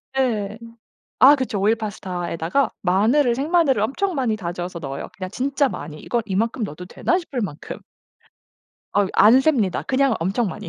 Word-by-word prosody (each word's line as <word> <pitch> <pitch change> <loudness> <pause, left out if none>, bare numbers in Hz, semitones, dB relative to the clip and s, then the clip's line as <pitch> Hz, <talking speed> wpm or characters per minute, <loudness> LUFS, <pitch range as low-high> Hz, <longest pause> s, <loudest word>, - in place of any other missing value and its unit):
네. 220 -5 -1 0.6
아 285 +3 +8
그쵸. 255 -7 -2
오일 215 +3 +3
파스타에다가 185 +1 -2
마늘을 235 +8 +3
생마늘을 290 -3 +2
엄청 345 - -1
많이 250 -5 0
다져서 175 -2 -5
넣어요, 135 -2 -6
그냥 185 -1 -6
진짜 275 +4 0
많이 155 -10 -7
'이거 240 - -1
이만큼 220 +4 -1
넣어도 180 -2 -7
되나?' 350 - 0
싶을 290 -8 -5
만큼. 160 -6 -6 1.2
어유 205 -1 +2
안 230 +5 +7
셉니다. 250 - +1
그냥 270 -2 +1
엄청 195 +6 0
많이 210 +3 -7
220 Hz, 345 characters per minute, -22 LUFS, 185-265 Hz, 1.2 s, 아